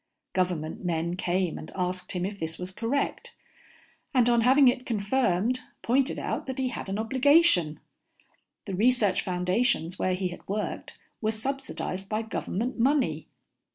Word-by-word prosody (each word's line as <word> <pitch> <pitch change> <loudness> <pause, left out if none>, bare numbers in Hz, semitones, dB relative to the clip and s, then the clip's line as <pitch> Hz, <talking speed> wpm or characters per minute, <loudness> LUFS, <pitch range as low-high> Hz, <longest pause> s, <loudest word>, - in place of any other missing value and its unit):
Government 180 -4 -1
men 170 0 -1
came 180 -1 -1
and - - -9
asked 180 0 -2
him 180 -1 -1
if 200 +1 -5
this 160 0 -4
was 180 +1 -4
correct, 235 +8 -2 0.8
and 245 -2 +5
on 235 -1 +4
having 260 +3 +6
it 250 0 +2
confirmed 230 0 +1 0.2
pointed 265 +4 +2
out - - -3
that 260 - -4
he 260 -1 0
had 225 - -6
an 195 - -2
obligation. 255 - +4 0.9
The 195 - -5
research 210 -1 +3
foundations 180 0 0
where 185 0 +1
he 185 0 -1
had 175 - -10
worked 210 +2 -4 0.2
were 215 - +1
subsidized 220 -5 -4
by 215 +1 -1
government 225 +2 -3
money. 240 - +2
205 Hz, 150 wpm, -27 LUFS, 180-250 Hz, 0.9 s, having